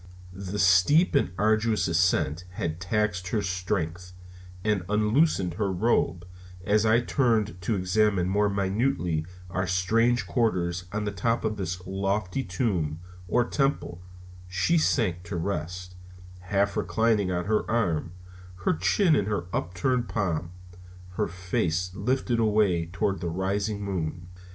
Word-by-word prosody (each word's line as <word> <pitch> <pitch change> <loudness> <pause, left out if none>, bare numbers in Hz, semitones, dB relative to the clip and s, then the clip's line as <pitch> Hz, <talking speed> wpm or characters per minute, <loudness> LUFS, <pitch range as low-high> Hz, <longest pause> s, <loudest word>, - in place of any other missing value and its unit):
The 95 +1 -5
steep 95 - +5
and 140 - +3
arduous 110 +1 +2
ascent 85 -1 +1
had 85 -2 -3
taxed 95 -1 -1
her 105 +2 -1
strength, 90 -1 -3 0.5
and 105 -3 +1
unloosing 105 - +2
her 100 +3 -1
robe 90 -3 +1 0.4
as 105 +2 +3
I 115 +2 +4
turned 110 - +1
to 105 +5 0
examine 95 0 +2
more 105 +2 +2
minutely 95 - 0 0.2
our 95 +1 -1
strange 115 +7 +2
quarters 90 -7 0
on 105 0 -2
the 105 - -1
top 115 +4 -1
of 110 -1 -1
this 90 -2 -4
lofty 95 +4 -1
tomb, 90 -7 -1 0.3
or 120 +7 +2
temple, 135 - -1 0.5
she 90 - +1
sank 105 - +1
to 95 +1 -5
rest, 90 +1 -4 0.5
half 100 +2 0
reclining 110 -4 +1
on 90 -1 -1
her 105 +2 0
arm, 85 -7 0 0.5
her - - +4
chin 155 - +3
in 105 - +1
her 105 -5 -1
upturned 120 +8 -1
palm, 85 -6 -1 0.6
her 90 - -1
face 90 0 -2
lifted 120 +3 0
away 105 -6 +2
toward 95 +3 -1
the 85 - -2
rising 100 +4 -2
moon. 85 -2 -3
95 Hz, 135 wpm, -27 LUFS, 90-110 Hz, 0.6 s, steep